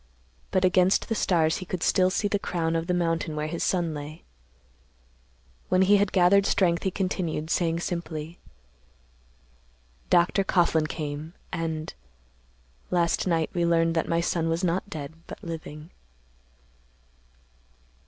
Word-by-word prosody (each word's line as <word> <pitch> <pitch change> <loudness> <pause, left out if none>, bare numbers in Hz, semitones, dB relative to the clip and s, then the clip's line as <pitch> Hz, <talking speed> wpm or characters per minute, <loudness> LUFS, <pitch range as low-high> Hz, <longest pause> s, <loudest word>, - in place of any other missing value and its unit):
But 185 0 +2
against 185 +1 +3
the - - +1
stars 165 -6 +2
he 185 - -7
could 185 -2 -3
still 185 -1 +3
see 205 +2 0
the 205 0 0
crown 165 -4 -1
of 165 0 -1
the 180 - +1
mountain 165 -2 -1
where 150 0 -2
his 165 +2 -3
son 175 -4 0
lay. 150 +1 -8 1.5
When 185 +1 +4
he 205 +2 +5
had 200 -1 +1
gathered 195 +2 +4
strength, 175 -4 +2
he 190 - 0
continued, 175 -5 -2
saying 170 -1 +1
simply, 170 -2 -5 1.7
"Dr. 180 +3 +3
Coughlan 170 -4 +2
came, 150 +1 -5 0.2
and—last 65 - -4
night 165 -3 +1
we 175 - 0
learned 165 -1 +2
that 160 - -1
my 170 0 +2
son 165 -1 0
was 165 +3 -1
not 180 +3 0
dead 150 -4 -6
but - - -10
living." 160 -1 -7
170 Hz, 135 wpm, -26 LUFS, 155-180 Hz, 1.7 s, he